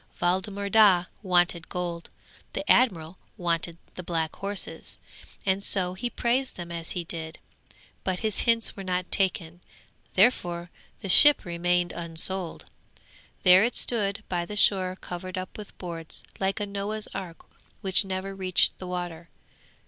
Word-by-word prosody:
Waldemar 190 +3 -1
Daa 200 -4 +5 0.2
wanted 175 -3 +1
gold; 175 -1 -4 0.4
the 295 - -4
admiral 180 -9 +2 0.2
wanted 170 -1 -1 0.2
the - - -7
black 165 -2 -2
horses, 200 0 -5 0.5
and 190 0 +1
so 185 -2 +1
he 240 +6 -4
praised 250 +3 0
them 170 -1 -8
as 165 -1 -4
he 175 - -3
did; 160 -1 -7 0.7
but 185 -1 -2
his 215 -3 -1
hints 230 -2 +2
were 195 - -7
not 180 -1 -2
taken, 180 -3 0 0.5
therefore 175 -5 +2 0.3
the 200 - -5
ship 290 +10 +9
remained 175 0 0
unsold. 170 +2 -2 0.8
There 185 +1 +7
it 240 - 0
stood 215 -2 +1
by 175 -2 -1
the 210 +4 -6
shore 185 -2 +3
covered 185 +1 -7
up 185 0 -6
with 210 -2 -10
boards, 165 -3 -3 0.2
like 195 +2 0
a 205 - -1
Noah's 205 +2 -4
Ark 170 -4 -7 0.4
which 190 0 +3
never 190 0 -4
reached 185 -2 +1
the 185 - -7
water. 175 -2 -5
185 Hz, 145 wpm, -26 LUFS, 175-200 Hz, 0.8 s, ship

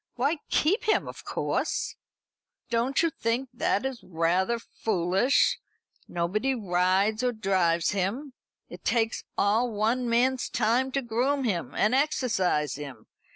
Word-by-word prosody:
Why, 280 +6 +1
keep 370 +9 +2
him, 430 - +2
of - - -9
course!" - - -2 0.8
"Don't 240 +6 +1
you 335 - +2
think 245 +1 -2
that 240 -1 0
is 265 -2 -4
rather 180 +6 +1
foolish? 205 +3 +1 0.5
Nobody 210 +10 -1
rides 195 +1 +1
or 250 - +2
drives 185 -6 +1
him. 210 +9 -2 0.3
It - - -11
takes 225 -2 0
all 225 +4 +2
one 230 +4 0
man's 250 +2 +2
time 240 +4 +1
to 275 - 0
groom 255 +5 0
him 170 - -2
and 215 +3 +2
exercise 225 - +1
him. 135 -7 -9
225 Hz, 130 wpm, -27 LUFS, 185-255 Hz, 0.8 s, keep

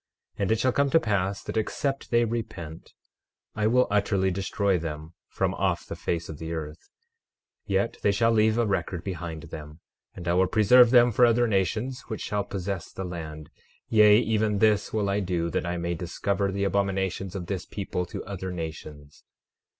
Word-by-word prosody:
12:8 - - -6
And 100 - +1
it 110 - +2
shall 130 +2 +2
come 140 +2 +2
to 165 - +5
pass 100 -5 -1
that - - -5
except 135 +5 -2
they 120 -1 +3
repent 95 -9 -6 0.6
I 105 0 0
will 125 +3 +4
utterly 100 -2 +2
destroy 95 0 0
them 80 0 -6 0.2
from - - -1
off - - -1
the - - -6
face 85 -1 -3
of 75 - -8
the 80 0 -5
earth; 75 -2 -7 0.8
yet 100 +3 0
they 100 - +3
shall 115 +3 +2
leave 110 0 +3
a 120 - +2
record 90 -3 -2
behind 85 -4 -5
them, 75 -1 -9 0.4
and 90 -1 -8
I 85 - +2
will 95 +1 +3
preserve 115 +5 +6
them 120 0 +6
for 125 - +3
other 120 0 +4
nations 110 +6 -1
which 110 -3 -5
shall 105 -1 -1
possess 95 -2 -5
the 95 - -5
land; 80 -4 -7 0.4
yea, 105 -1 +7
even 110 -2 +1
this 105 0 +2
will 105 -2 0
I 100 +1 +1
do 90 -3 -1
that 90 - -1
I 90 0 -2
may 85 0 -2
discover 100 +4 -2
the 100 +1 -2
abominations 95 -1 -1
of 90 -3 -4
this 90 -1 -4
people 90 -3 -4
to - - -7
other 95 -1 -5
nations. 80 -4 -8
100 Hz, 190 wpm, -26 LUFS, 85-110 Hz, 0.8 s, yea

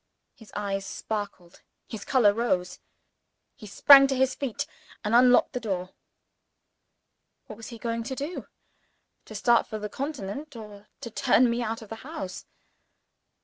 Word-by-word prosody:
His 225 - -17
eyes 200 -1 -2
sparkled; 200 -4 -6 0.3
his 220 -3 -7
color 235 -7 +4
rose. 205 -6 -1 0.8
He 220 -6 -12
sprang 275 +6 +8
to 270 - -1
his 260 0 +2
feet, 270 -6 -4 0.4
and 210 - -2
unlocked 245 +2 +5
the 250 - -2
door. 185 -5 -4 1.5
What 215 - -10
was 225 - -9
he 235 - -9
going 230 +1 -3
to 265 +2 -4
do? 290 +6 -5 0.8
To - - -11
start 240 -1 +3
for 215 - -5
the 210 0 -5
Continent, 275 +1 -6
or 210 -2 -11
to 235 - -7
turn 240 +2 +3
me 235 +1 -1
out 225 -1 -3
of 215 - -14
the 225 - -7
house? 265 - -7
230 Hz, 150 wpm, -26 LUFS, 205-255 Hz, 1.5 s, sprang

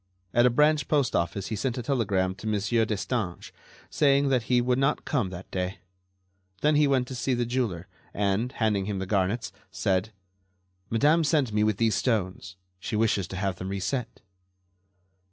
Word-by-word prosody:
At 120 +1 +5
a - - +5
branch 150 +2 +3
postoffice 100 - 0
he 110 - -2
sent 130 +3 -2
a 125 - -3
telegram 100 -8 0
to 100 +3 -9
Monsieur 110 +2 +1
Destange, 105 -3 -3 0.4
saying 140 -1 +3
that 130 -2 +2
he 125 -1 +4
could 125 +1 +1
not 140 +2 +1
come 125 -10 0
that 90 +1 -9
day. 90 0 -2 0.8
Then 150 +1 +3
he 150 0 +4
went 130 -3 +1
to - - -5
see 125 +1 -1
the 120 0 0
jeweler 115 -8 -2 0.2
and, 100 +4 0
handing 105 -5 0
him 100 -1 -3
the 95 - -3
garnets, 95 +1 0 0.2
said: 95 +1 0 0.8
"Madame 150 +8 +3
sent 145 -7 +1
me 105 0 +2
with 105 -2 +1
these 115 0 +2
stones. 95 -5 -1 0.2
She 95 - -4
wishes 105 -4 +1
to - - -7
have 95 -1 -2
them 95 +1 -5
reset." 105 +6 -3
110 Hz, 170 wpm, -27 LUFS, 95-130 Hz, 0.8 s, At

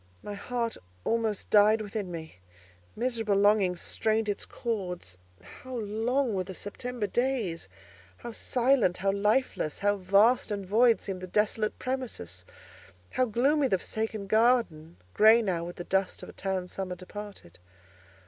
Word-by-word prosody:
My 205 - -5
heart 230 +3 -3 0.3
almost 225 -3 -1
died 210 +1 +6
within 205 -2 -4
me; 160 - -8 0.6
miserable 225 -3 0
longings 200 -3 +3
strained 220 0 0
its 205 -1 -2
chords. 180 - -4 0.2
How 255 - -10
long 230 +4 0
were 190 -1 0
the 190 0 -8
September 240 +4 -4
days! 215 - -1 0.5
How 235 - -7
silent, 240 -5 +2
how 195 +1 +1
lifeless! 210 - 0
How 205 0 +1
vast 200 +7 +3
and 200 -2 -3
void 230 +4 +4
seemed 190 -2 -5
the 185 - -6
desolate 215 +2 0
premises! 220 - -5 0.7
How 255 - +2
gloomy 270 +6 +2
the 190 - +2
forsaken 220 +1 -3
garden—grey 215 - +3
now 175 -5 -1
with 175 - -7
the 175 - -6
dust 190 +1 -1
of - - -8
a - - -11
town 190 -2 -3
summer 185 0 -5
departed. 195 - -10
210 Hz, 140 wpm, -28 LUFS, 185-230 Hz, 0.7 s, died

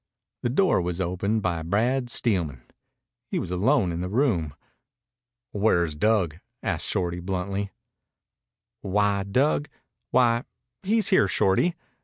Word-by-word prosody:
The 120 - 0
door 165 - +3
was 90 0 -3
opened 95 +4 -1
by 85 -3 -1
Brad 120 +9 0
Steelman. 85 - -1 0.7
He - - -1
was - - -3
alone 100 +2 +2
in 85 +1 -3
the 90 - -3
room. 95 - +1 1.0
"Where's 90 -6 +2
Dug?" 90 -2 +1 0.2
asked - - -2
Shorty 90 -1 -1
bluntly. 95 +2 -3 1.1
"Why, 100 0 +1
Dug 140 +9 +1 0.4
why, 120 0 +3 0.4
he's 220 +3 +1
here, 190 - +4
Shorty. 100 - +2
100 Hz, 120 wpm, -25 LUFS, 90-120 Hz, 1.1 s, here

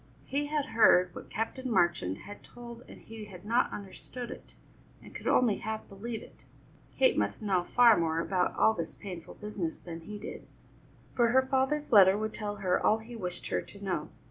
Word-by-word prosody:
He 290 +2 -1
had 295 -3 -1
heard 180 -5 +5
what - - -10
Captain 255 +4 -3
Marchand 170 - +2
had 205 - -10
told 235 -1 -11
and - - -13
he 225 -1 -9
had 190 -2 -12
not 235 +3 +2
understood 235 +5 -7
it, - - -11 0.4
and - - -14
could - - -7
only 230 -5 +4
half 220 0 -5
believe 220 +3 -6
it. - - -17 0.5
Kate - - +4
must - - -2
know 190 -4 +2
far 235 +3 +6
more 165 -1 0
about 180 +1 0
all 220 - +4
this 170 -5 -5
painful 180 -4 -8
business 205 -6 -4
than 165 -2 -8
he 210 +5 -7
did, 205 - -8 0.7
for 240 -1 +3
her 260 +3 +4
father's 265 +3 0
letter 195 -3 +7
would 215 0 -3
tell 205 -2 -4
her 185 -3 0
all 215 - +4
he 225 +2 -10
wished 180 -5 -5
her - - 0
to 200 0 -12
know. 175 -6 -2
210 Hz, 195 wpm, -30 LUFS, 185-240 Hz, 0.7 s, letter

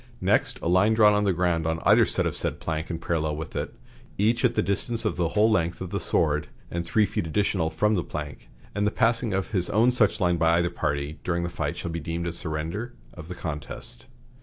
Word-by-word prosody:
Next, - - +1
a - - -1
line 95 +5 +4
drawn 105 -2 +6
on 105 0 +2
the 100 - +3
ground 85 -2 0
on 80 0 0
either - - +5
side - - 0
of - - -1
said - - -3
plank 80 +1 -3
and 85 -2 -3
parallel 80 -3 -1
with 80 +1 -7
it, - - -3 0.4
each 115 +4 +2
at 120 -2 +3
the 110 - +2
distance 115 +3 -1
of 110 - 0
the 85 -1 +1
whole 110 +2 +5
length 85 -5 +1
of 95 -1 -6
the 100 - -1
sword 75 -3 +1 0.2
and 85 0 -2
three 105 +5 +2
feet 85 - -3
additional 90 -1 0
from 105 +7 +1
the 90 -5 0
plank, 75 -3 -7 0.2
and 105 +1 0
the - - +1
passing 115 -1 +1
of 95 +4 -2
his 90 -5 0
own 115 +4 +4
such 110 -3 +2
line 90 -3 +2
by 80 0 +3
either 85 0 +1
party 70 -2 -2
during 85 -1 -1
the 85 - -2
fight - - -3
shall 85 - -4
be 85 - -3
deemed 85 +2 -4
a 85 - -2
surrender 85 +9 -4 0.2
of 85 -3 -10
the 90 - -6
contest." 75 -7 -6
85 Hz, 235 wpm, -26 LUFS, 80-105 Hz, 0.4 s, drawn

